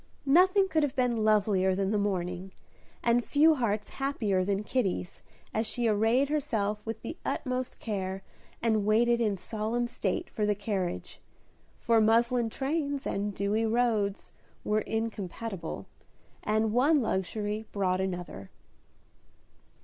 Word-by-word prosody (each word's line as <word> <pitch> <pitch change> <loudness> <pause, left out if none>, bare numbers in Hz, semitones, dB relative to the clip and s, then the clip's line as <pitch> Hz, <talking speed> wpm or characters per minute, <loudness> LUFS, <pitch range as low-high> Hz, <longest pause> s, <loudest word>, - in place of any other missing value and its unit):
Nothing 370 +7 +5
could 320 -4 +1
have 290 -3 0
been 245 -4 +1
lovelier 200 -3 +3
than 195 +1 0
the 210 - +1
morning, 185 -2 -2 0.5
and 240 +1 +3
few 310 +5 +5
hearts 215 -6 -1
happier 225 -9 0
than 200 +2 -1
Kitty's, 200 -7 -2 0.3
as 220 +1 0
she 240 +1 0
arrayed 225 +6 +3
herself 220 -9 -1
with 225 0 -5
the 320 +8 -6
utmost 255 -1 -2
care, 195 -3 -4 0.4
and 220 -3 +2
waited 235 +3 +3
in 210 -4 +1
solemn 220 +5 -2
state 205 -5 -2
for 215 - -4
the 210 0 +2
carriage; 190 - -3 0.6
for 230 -1 +3
muslin 230 +2 +3
trains 280 +2 -2
and 200 0 -2
dewy 210 +3 0
roads 220 -4 0 0.3
were 215 +1 +1
incompatible, 220 -5 -4 0.6
and 215 0 +1
one 285 +6 +4
luxury 210 +2 -2
brought 185 -2 0
another. 175 - -5
220 Hz, 130 wpm, -29 LUFS, 200-240 Hz, 0.6 s, Nothing